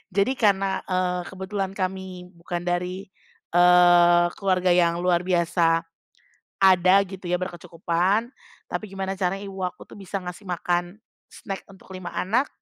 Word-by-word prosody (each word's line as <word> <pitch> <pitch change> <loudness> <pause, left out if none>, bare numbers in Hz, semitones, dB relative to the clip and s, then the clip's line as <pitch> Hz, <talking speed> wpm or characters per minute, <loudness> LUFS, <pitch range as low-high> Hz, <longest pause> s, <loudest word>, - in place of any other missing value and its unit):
jadi 200 +6 +3
karena, 195 -4 +1
eee, 180 -1 0
kebetulan 190 0 -4
kami 185 -2 -5
bukan 175 +1 -5
dari, 180 +2 -2 0.5
eee, 175 -1 +6
keluarga 185 -2 +1
yang 170 -1 +2
luar 175 -1 +1
biasa, 170 -2 +2 0.8
ada 185 -1 +5
gitu 190 0 -10
ya, 180 - +1
berkecukupan, 180 +4 -1 0.4
tapi - - -4
gimana 195 0 -4
caranya 190 0 -1
ibu 195 -1 -5
aku 180 - -6
tuh - - -13
bisa 195 0 -5
ngasih 180 +3 -8
makan 175 +2 -2 0.3
snack 195 -2 -7
untuk 190 - -18
5 180 -1 -7
anak, 235 +9 0
185 Hz, 140 wpm, -24 LUFS, 175-195 Hz, 0.8 s, eee